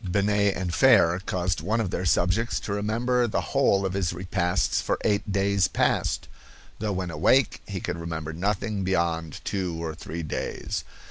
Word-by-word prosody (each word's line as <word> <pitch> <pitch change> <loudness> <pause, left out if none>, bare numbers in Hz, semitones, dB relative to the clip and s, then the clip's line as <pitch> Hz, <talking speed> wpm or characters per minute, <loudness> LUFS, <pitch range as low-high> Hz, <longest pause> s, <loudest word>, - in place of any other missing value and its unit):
Binet 100 +1 +2
and 90 -2 -3
Fere 100 -9 +5
caused 90 -4 -1
one 110 +8 0
of 105 -5 -1
their 90 - -2
subjects 90 +7 +1
to 100 - -3
remember 120 +4 +1
the 110 - -2
whole 100 -8 +3
of 95 - -2
his 95 -3 0
repasts 90 0 0
for - - 0
eight 100 0 +1
days 100 0 +2
past, - - 0 0.5
though 105 -1 -1
when 90 -2 -3
awake 110 - +3
he 100 -2 -4
could 90 -1 -4
remember 80 -2 -4
nothing 100 +3 -1
beyond 85 -4 -1
two 90 -4 -2
or 80 -1 -3
three 80 +2 -6
days. 75 - -3
95 Hz, 170 wpm, -26 LUFS, 85-105 Hz, 0.5 s, Fere